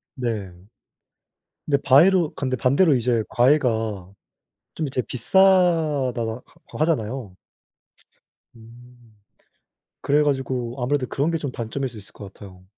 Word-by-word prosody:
네. 110 -7 -4 1.1
근데 145 -2 +2
바위로 165 +4 +4
근데 130 -2 -2
반대로 140 +5 +3
이제 120 -2 0
과외가 130 +2 +3 1.0
좀 155 -2 -3
이제 130 -1 -2
비싸다하 165 - +2 0.5
고 - - -11
하잖아요. 125 - -2 1.2
음 120 0 -18 0.9
그래 150 +1 +2
가지고 130 -3 -2
아무래도 130 +1 -1
그런게 165 +4 -1
좀 145 -4 -5
단점일 125 +3 -4
수 120 - -13
있을 100 - -13
것 100 -2 -11
같아요. 95 -3 -14
130 Hz, 245 characters per minute, -22 LUFS, 115-150 Hz, 1.2 s, 바위로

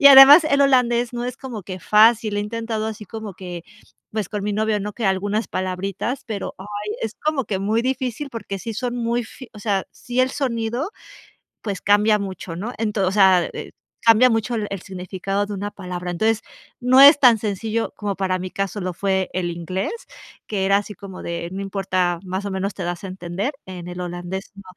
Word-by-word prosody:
Y 280 - +8
además, 280 +4 +11
el 280 -2 +3
holandés 245 -3 +3
no 240 0 -3
es 250 - -5
como 245 -7 -7
que 185 +1 -7
fácil, 215 +1 +4
he - - +1
intentado 225 0 -3
así 215 -1 -6
como 215 -1 -7
que 180 -3 -8 0.5
pues 215 -4 -2
con 205 -1 -4
mi 210 - -1
novio, 215 0 +1
¿no?, 210 +1 -4
que 230 - -4
algunas 205 +3 0
palabritas, 195 +7 -3
pero, 210 -3 -4
ay, 190 - -9 0.4
es 225 +1 -3
como 300 -5 0
que 195 - -1
muy 215 +4 +1
difícil, 260 +1 -2
porque 210 -4 -5
sí 230 - -5
son 245 +2 -2
muy 235 0 0
fi 255 +3 -12
o - - -10
sea, 200 -2 -1
sí, 245 +1 -2
el 255 0 +3
sonido, 245 - -2 0.7
pues 200 -3 -4
cambia 210 +1 +4
mucho, 185 -3 -6
¿no?, 215 +7 -4
ento 210 -4 0
o - - +1
sea, 190 -3 +5
eh, - - -7 0.3
cambia 230 +2 +6
mucho 225 +1 0
el 210 -2 -2
el 195 -3 -4
significado 190 +1 -3
de 205 - -5
una 205 +1 -4
palabra, 180 -2 -5
entonces, 220 +5 +1 0.4
no 255 +2 +6
es 285 +1 +10
tan 245 -5 +6
sencillo 220 +2 -2
como, 205 -2 -2
para 185 -1 0
mi 185 0 -5
caso, 195 +1 -3
lo 180 0 -3
fue 190 0 0
el 180 -1 -1
inglés, 185 - -3 0.5
que 195 -3 -1
era 195 +1 +4
así, 205 +1 -4
como 195 -2 -9
de: 170 0 -4
"No 195 - -4
importa, 185 -3 0
más 190 +2 -4
o 200 - -3
menos 190 +1 -2
te 185 - -5
das 175 +2 -4
a 195 - -4
entender", 185 +7 -3
en 180 -2 -8
el 180 0 -7
holandés, 175 +3 -5
no, 200 - -11
205 Hz, 210 wpm, -22 LUFS, 190-230 Hz, 0.7 s, además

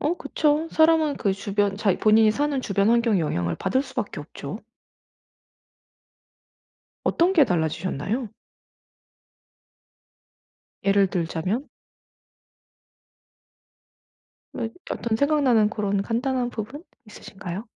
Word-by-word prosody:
어 310 +4 +1
그쵸. 300 0 0
사람은 315 -2 +3
그 200 -3 0
주변 200 0 -1
자기 200 -2 +1
본인이 215 0 +5
사는 285 +3 0
주변 200 -3 +1
환경의 230 -5 +3
영향을 85 - -1
받을 260 +8 0
수밖에 - - -5
없죠. - - -8 2.4
어떤 350 +3 +2
게 315 -6 +6
달라지셨나요? 180 - -2 2.6
예를 195 0 +4
들자면? 180 - -2 2.9
이 230 -2 -2 0.2
어떤 225 -2 -1
생각나는 270 -6 +3
고런 200 -2 -1
간단한 245 +2 -1
부분 250 - -7 0.2
있으신가요? 195 -1 -8
220 Hz, 215 characters per minute, -24 LUFS, 195-275 Hz, 2.9 s, 게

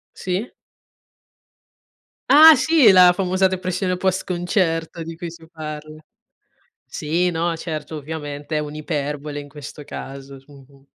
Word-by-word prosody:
Sì. 185 +6 -3 1.8
Ah, 310 +2 +9
sì, 270 -5 +5
la 180 -1 +7
famosa 185 +1 +1
depressione 185 0 -2
post-concerto 175 -3 -1
di 165 0 -8
cui 170 -1 -6
si 165 -1 -14
parla. 155 -1 -8 0.8
Sì, 170 +4 -1
no, 165 0 -1
certo, 155 -2 -6
ovviamente 145 0 -6
è - - +1
un'iperbole 150 -1 -4
in 145 - -9
questo 145 +1 -10
caso. 135 0 -9
Mh-mh. 140 -1 -18
165 Hz, 115 wpm, -21 LUFS, 150-180 Hz, 1.8 s, Ah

